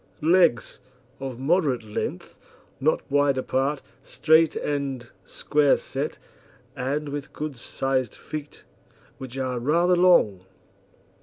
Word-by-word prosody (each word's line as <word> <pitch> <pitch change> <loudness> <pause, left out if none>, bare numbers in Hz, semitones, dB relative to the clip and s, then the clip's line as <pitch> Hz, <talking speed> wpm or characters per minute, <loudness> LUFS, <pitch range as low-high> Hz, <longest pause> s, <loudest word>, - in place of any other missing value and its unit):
LEGS 165 -8 +3 0.4
Of 135 -3 -5
moderate 140 -3 +1
length, 105 -1 -5 0.4
not 155 +4 +1
wide 145 -1 +3
apart, 135 +2 -1 0.2
straight 160 0 +3
and 140 -4 -3 0.2
square 145 +6 +2
set, - - -5 0.6
and 145 +3 -2
with 145 -1 -6
good 150 -2 -5
sized 130 +1 -2
feet, 150 -1 -8 0.6
which 130 0 -8
are 130 -2 -2
rather 170 +8 +2
long. 175 - +4
140 Hz, 105 wpm, -25 LUFS, 130-155 Hz, 0.6 s, long